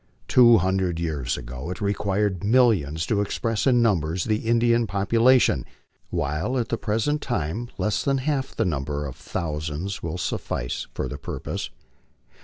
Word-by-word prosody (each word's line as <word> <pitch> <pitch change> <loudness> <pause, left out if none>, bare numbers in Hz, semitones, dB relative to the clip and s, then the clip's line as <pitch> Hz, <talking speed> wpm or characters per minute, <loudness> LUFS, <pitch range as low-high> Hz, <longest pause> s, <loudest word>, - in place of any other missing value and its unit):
Two 120 -2 +7
hundred 95 -2 0
years 75 -7 -2
ago 65 +5 -7
it 90 - -5
required 100 -2 0
millions 100 - +3
to 105 -2 +1
express 115 +3 -1
in 120 -2 +4
numbers 85 -5 +1
the 110 -1 +1
Indian 115 0 +3
population, 115 +6 +3 0.5
while 75 - -1
at 120 -2 -1
the 115 - 0
present 115 +8 0
time 115 - -2
less 105 - 0
than 135 -1 +1
half 135 0 -2
the - - +1
number 75 -3 -2
of 65 - -6
thousands 80 +4 -4
will 80 +1 -4
suffice - - -3
for - - -2
the - - -7
purpose. - - -5
100 Hz, 150 wpm, -24 LUFS, 80-115 Hz, 0.5 s, Two